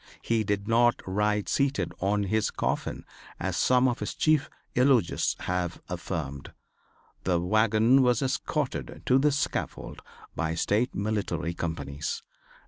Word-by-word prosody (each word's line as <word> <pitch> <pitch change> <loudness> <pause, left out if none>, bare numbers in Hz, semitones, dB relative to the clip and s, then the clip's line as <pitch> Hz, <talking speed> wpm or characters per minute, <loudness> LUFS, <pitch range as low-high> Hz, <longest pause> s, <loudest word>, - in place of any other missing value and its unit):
He 115 -1 +1
did 100 0 -2
not 120 +1 +4
ride 105 +2 0
seated 140 -1 0
on 100 +2 +1
his 110 +2 +1
coffin - - -2 0.3
as - - -2
some 125 0 +4
of 125 +1 -1
his - - -4
chief 155 -3 +2 0.2
eulogists 125 -7 +3
have 90 -1 -2
affirmed. 80 -6 -5 0.7
The 90 -2 +2
wagon 110 +7 +4
was 125 -1 +3
escorted 135 +1 -2
to 130 +1 +4
the 150 +2 +3
scaffold 140 0 -3 0.3
by 80 0 -1
State 105 +8 +1
military 100 -4 -1
companies. 75 -4 -4
110 Hz, 130 wpm, -27 LUFS, 90-125 Hz, 0.7 s, not